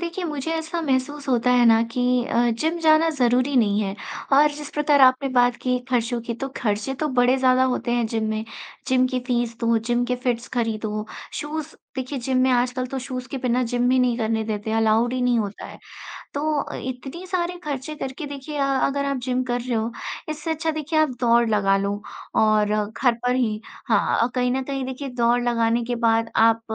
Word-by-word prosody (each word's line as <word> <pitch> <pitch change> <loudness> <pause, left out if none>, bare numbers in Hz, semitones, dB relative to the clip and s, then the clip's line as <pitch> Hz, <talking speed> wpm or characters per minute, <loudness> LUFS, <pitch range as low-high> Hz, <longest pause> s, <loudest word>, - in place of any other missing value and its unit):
देखिए, 345 +1 -4
मुझे 300 -1 -3
ऐसा 325 +1 -3
महसूस 280 +1 -1
होता 250 -1 +2
है 245 -1 +5
ना 225 0 +6
कि 250 0 +1
अ, 240 0 +2
जिम 315 +9 -1
जाना 315 0 +5
ज़रूरी 255 -1 +1
नहीं 210 -3 +3
है 195 -2 -2 0.4
और 295 +2 +6
जिस 295 0 -8
प्रकार 295 -1 +3
आपने 260 +1 +5
बात 245 -1 +3
की 250 -1 +1
खर्चों 240 -1 0
की, 235 0 -4
तो 270 +4 -5
खर्चे 215 +3 -1
तो 305 +3 -2
बड़े 245 +1 +4
ज़्यादा 260 0 +4
होते 245 - -2
हैं 240 -2 +1
जिम 220 -1 -2
में, 220 0 -2 0.4
जिम 255 0 +3
की 255 0 -2
फ़ीस 240 -2 -1
दो, 230 0 +2
जिम 240 +2 0
के 250 +1 -1
फिट्स 240 -1 -1
खरीदो, 215 -2 -2 0.3
शूज़ 310 +1 -5 0.2
देखिए, 260 +2 -3
जिम 255 +1 0
में 260 - +3
आजकल 250 +1 +1
तो 270 - -1
शूज़ 255 -1 -5
के - - -4
बिना 250 0 +1
जिम 245 0 +2
भी 255 - +3
नहीं 250 -2 +2
करने 220 -1 0
देते, 215 0 -3
अलाउड 225 +2 +2
ही 255 - -1
नहीं 245 -1 +2
होता 205 -1 -4
है। - - -11 0.6
तो 300 +1 0
अ, - - -7
इतनी 260 +7 -6
सारे 355 -1 -2
खर्चे 290 +1 -4
करके 270 +2 -5
देखिए 285 +1 -7
अ, 280 - +1 0.2
अगर 280 0 -1
आप 280 -1 -1
जिम 255 0 0
कर 245 -1 -2
रहे 245 0 -2
हो, 225 +2 -2 0.4
इससे 310 +1 -3
अच्छा 320 +1 -1
देखिए 310 +1 -1
आप 310 -1 +3
दौड़ 235 -1 +4
लगा 195 -2 +3
लो 200 +1 -2 0.4
और 215 -1 +3
घर 235 +3 +1
पर 250 0 +2
ही 220 -4 0 0.3
हाँ 215 -4 +2
अ, 235 - +2
कहीं 250 0 +1
न 265 +1 0
कहीं 270 -1 -3
देखिए, 265 +2 -5
दौड़ 245 0 +2
लगाने 235 -1 +1
के 245 +1 -2
बाद 225 0 +2
आप 225 0 +4
250 Hz, 210 wpm, -23 LUFS, 230-275 Hz, 0.6 s, ना